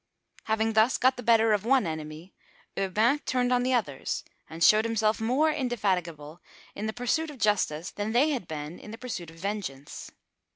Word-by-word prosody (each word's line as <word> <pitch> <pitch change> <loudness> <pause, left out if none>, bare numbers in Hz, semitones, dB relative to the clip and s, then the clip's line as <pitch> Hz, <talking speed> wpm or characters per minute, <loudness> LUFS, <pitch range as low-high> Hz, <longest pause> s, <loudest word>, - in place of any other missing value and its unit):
Having 220 0 0
thus 220 +3 +4
got 260 +1 +3
the 245 - -7
better 225 -1 +4
of 205 -2 0
one 260 -1 +3
enemy, 155 +2 -6 0.4
Urbain 215 +9 +2
turned 250 -3 0
on 245 - +3
the 255 +1 +1
others, 150 - -2 0.3
and 165 +1 -3
showed 215 +5 +6
himself 220 -1 0
more 265 +8 +2
indefatigable 180 - -2 0.3
in 210 +2 -4
the - - -1
pursuit 245 +8 -1
of 295 - -10
justice 195 -7 0
than 205 +1 -3
they 270 +7 +3
had 245 - -3
been 155 +2 -6
in - - -11
the 225 - -8
pursuit 225 -9 -6
of 165 - -14
vengeance. 180 -7 -5
215 Hz, 180 wpm, -27 LUFS, 175-245 Hz, 0.4 s, showed